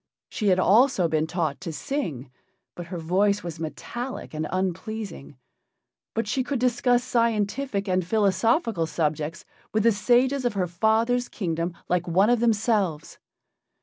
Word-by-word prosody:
She 210 - -2
had 185 -2 +4
also 205 +1 +4
been 155 0 0
taught 160 -4 -2
to 175 -3 -4
sing, 160 - -4 0.4
but 175 -1 -8
her 180 0 -5
voice 195 +5 +1
was 170 -2 -6
metallic 240 +11 -6
and 155 0 -3
unpleasing. 185 - -4 0.8
But 225 -1 -1
she 260 +5 0
could 275 +1 -2
discuss 245 0 +2
scientific 230 -2 0
and 185 0 +1
philosophical 205 - +1
subjects 155 0 -2 0.3
with 215 - +3
the 230 - +5
sages 250 +6 +2
of 245 -3 0
her 190 -3 0
father's 220 +7 +1
kingdom 170 -3 -3
like 180 0 0
one 190 +7 +3
of 245 - +3
themselves. 210 -8 0
200 Hz, 145 wpm, -25 LUFS, 170-235 Hz, 0.8 s, the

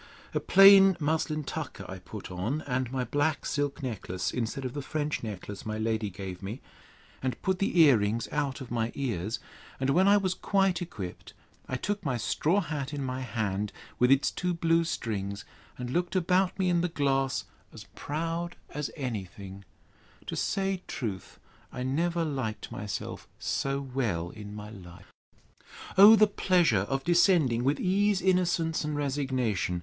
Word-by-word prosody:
A - - +1
plain 195 -1 +8
muslin 155 0 0
tucker 135 -9 -5
I 95 -1 -7
put 100 +2 -9
on, 105 +12 -2
and 125 -2 -2
my 130 -1 -1
black 145 +5 0
silk 145 +1 -2
necklace, 100 -7 -3
instead 125 +3 -3
of 125 - -3
the 145 - -4
French 150 +2 -2
necklace 105 -2 -6
my 110 0 -3
lady 110 -1 -1
gave 95 -1 -7
me; 105 +6 -5 0.6
and 130 -3 -2
put 190 -1 0
the 195 -3 +1
ear 140 -8 +7
rings 105 +3 -1
out 145 -2 -1
of 130 - -8
my 115 -1 -1
ears; 115 -5 -2 0.4
and 135 +1 +1
when 185 +7 +4
I 205 +1 +7
was 190 -2 0
quite 195 -3 +1
equipped, 100 - -7 0.3
I 130 - -2
took 205 +9 -3
my 135 -5 -1
straw 165 - +1
hat 150 -4 -4
in 140 - -3
my 130 0 -3
hand, 105 -5 -2 0.3
with 125 - +4
its 135 +1 +4
two 180 -1 -2
blue 165 0 +2
strings, 100 - -3 0.3
and 125 -1 -5
looked 175 +4 -1
about 185 +1 +2
me 190 -2 +1
in 175 -1 +3
the 180 - +1
glass, 135 -4 0 0.3
as - - -10
proud 165 +3 -3 0.2
as 150 -1 -3
any 120 -9 -3
thing—To 95 +2 -12
say 195 -2 -1
truth, 105 -7 -5 0.3
I 125 - -5
never 165 +6 0
liked 130 -8 -4
myself 105 -1 -5
so 135 0 -1
well 115 -11 -2
in 105 -1 -9
my 105 0 -8
life. 90 -5 -13 0.8
O 205 +3 +10
the 215 0 +6
pleasure 175 - +2
of 135 0 -1
descending 170 - +4
with 140 +3 +1
ease, 200 +1 +2
innocence, 175 -4 +1
and 150 0 -2
resignation! 130 -10 -1
135 Hz, 165 wpm, -29 LUFS, 110-170 Hz, 0.8 s, O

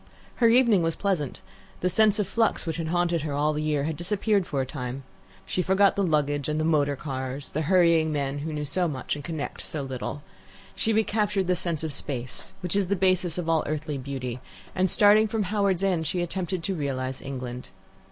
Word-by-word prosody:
Her 235 - +5
evening 235 -5 +5
was 165 -1 0
pleasant. 175 -10 -2 0.4
The 180 - +2
sense 210 +3 +4
of 210 - +1
flux 225 0 +1
which 165 -1 -3
had 165 -1 -3
haunted 175 0 +1
her 150 -1 -3
all 150 +2 +1
the 150 - -2
year 155 0 0
disappeared 195 +3 0
for 140 - -2
a 130 - 0
time. 130 0 -5 0.4
She 185 - -1
forgot 190 +2 +3
the 200 - 0
luggage 145 -5 +1
and 150 +1 0
the - - +1
motor 145 -3 +2
cars, 130 0 -4
and - - -21
the 155 0 -1
hurrying 170 -4 +4
men 140 -1 -2
who 155 +2 -4
know 150 -1 -3
so 175 +5 +1
much 135 -5 -3
and 145 - -7
connect 160 -2 -5
so 150 -3 -3
little. 135 +2 -5 0.5
She 225 - 0
recaptured 210 -3 +1
the 180 0 +2
sense 170 -3 -2
of 155 -2 -2
space, 130 -3 -2
which 180 0 -2
is 200 -2 +2
the 200 - +1
basis 185 -3 +2
of 175 -2 -3
all 165 -1 +3
earthly 150 -1 -3
beauty, 130 -2 -5 0.3
and, 185 0 +1
starting 210 +3 +6
from 215 0 -1
Howards 195 -2 +1
End, 175 -5 +1
she 175 +3 -1
attempted 180 0 -3
to 195 - -1
realize 130 -5 -3
England. 125 -2 -6
160 Hz, 210 wpm, -26 LUFS, 145-190 Hz, 0.5 s, starting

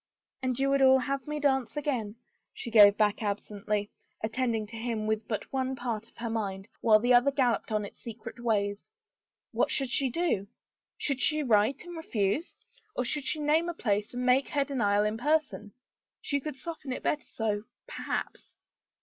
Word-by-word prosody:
" - - -57
And 255 -2 -1
you 275 0 +2
would 275 0 +3
all 265 0 +7
have 275 0 -2
me 300 0 -3
dance 265 -4 +1
again," 245 -8 -2 0.4
she 235 - -6
gave 205 -2 +8
back 210 0 +2
absently, 205 0 -2 0.3
attending 225 0 -1
to 220 +2 -11
him 225 -1 -2
with 215 0 -1
but 215 +3 -4
one 265 0 0
part 230 -3 -4
of - - -30
her 235 - -4
mind, 195 -3 -3
while 220 -2 +6
the 245 +3 +3
other 245 +3 +6
galloped 250 -6 +1
on 210 -1 0
its - - -12
secret 230 +1 -9
ways. 205 - 0 0.6
What - - +1
should 270 -3 0
she 270 0 +2
do? 280 - 0 0.5
Should 275 -3 -1
she 305 +2 +3
write 235 +5 +2
and 350 0 -8
refuse 245 - -1 0.2
— 435 -1 -34
or 250 - 0
should 285 +3 -2
she 315 - 0
name 310 +3 +2
a 345 - -4
place 210 -5 0
and 250 0 -3
make 255 +2 +4
her 285 -1 0
denial 210 -7 +2
in 210 +1 -1
person? 290 -7 0 0.5
She 285 - -1
could 300 0 -5
soften 295 -1 -6
it 255 - -4
better 300 - -1
so 215 -1 -2
— - - -64
perhaps. - - -5
245 Hz, 190 wpm, -29 LUFS, 215-275 Hz, 0.6 s, gave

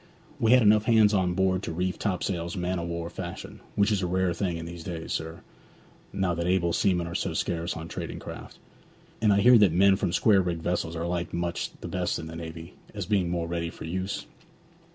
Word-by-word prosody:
We 115 +1 +4
had 125 -2 +6
enough 105 0 +5
hands 110 -3 +5
aboard 95 0 +1
to - - -4
reef 90 +3 -2
topsails 90 -3 -2
man 90 0 -1
o' - - -3
war 85 0 -4
fashion, 85 -2 -7 0.2
which 100 +2 +3
is 100 -2 +1
a 90 - 0
rare 90 0 +1
thing 85 -1 -2
in 85 - -6
these 85 0 -8
days, 85 -2 -5
sir, 80 +1 -4 0.7
now 95 -2 0
that 85 +1 -2
able 90 -2 +2
seamen 90 -3 +2
are 85 - -6
so 95 -2 -2
scarce 85 0 -2
on 80 0 -6
trading - - -5
craft. - - -9 0.6
And 110 -2 +4
I 100 0 +4
hear 120 +1 +7
that 100 -5 +5
men 95 +3 +5
from 90 - -1
square 100 +1 +4
rigged 85 -3 -3
vessels 85 -2 -1
are 85 0 -3
liked 85 -1 -2
much 85 0 -2
the - - -5
best - - -1
in 80 - -6
the 80 0 -8
navy, 80 0 -8 0.2
as - - -3
being 95 -4 +1
more 85 -1 -1
ready 85 0 -2
for - - -9
use? 95 +4 -3
90 Hz, 215 wpm, -27 LUFS, 85-95 Hz, 0.7 s, hear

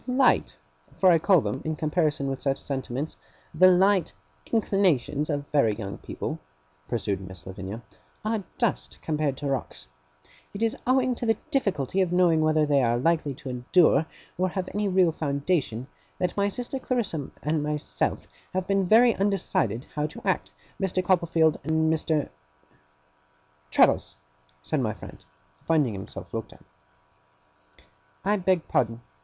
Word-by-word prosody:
'The 250 - -1
light 260 0 +3 0.4
for 185 -1 +6
I 165 - +5
call 180 0 +4
them, 135 - -3
in 155 0 -2
comparison 155 -2 0
with 135 -1 -3
such 135 -1 0
sentiments, 135 +1 -4 0.4
the 185 0 +7
light 190 -1 +4 0.4
inclinations 175 - +1
of 145 -2 -1
very 125 -8 +3
young 100 -3 -6
people,' - - -5 0.5
pursued 100 -4 -2
Miss 95 -4 -11
Lavinia, 95 +4 -7 0.4
'are 215 -2 -1
dust, 235 -5 -1
compared 150 -4 -1
to 145 - -6
rocks. 135 -2 -3 0.7
It 205 - -2
is 225 - +1
owing 255 0 +3
to 240 0 -4
the 225 -2 +3
difficulty 195 - 0
of 180 -2 +1
knowing 175 -3 +4
whether 155 0 +3
they 145 -2 +3
are 120 -1 +2
likely 150 0 +1
to 130 - -8
endure 140 +5 +3 0.3
or 185 0 +2
have 185 0 -3
any 210 0 0
real 185 -3 +4
foundation, 140 -5 -1 0.3
that 180 -1 -1
my 200 0 +1
sister 245 +5 -4
Clarissa 215 - -2
and 150 +1 0
myself 150 0 -2 0.3
have 185 -1 0
been 195 -1 +1
very 230 +4 +6
undecided 185 - 0
how 150 0 -1
to 155 - -11
act, 190 - 0 0.3
Mr. 185 -1 0
Copperfield, 165 -3 +3
and 160 +1 +2
Mr. 155 -1 0 0.7
' 75 0 -38
'Traddles,' - - +3 0.5
said 155 - -1
my 110 -4 0
friend, 95 - -12 0.4
finding 150 -8 +2
himself 95 -1 -8
looked - - -5
at. - - -20 1.6
'I 205 +1 +3
beg 185 -3 +1
pardon. 115 -1 0
155 Hz, 150 wpm, -26 LUFS, 135-190 Hz, 1.6 s, the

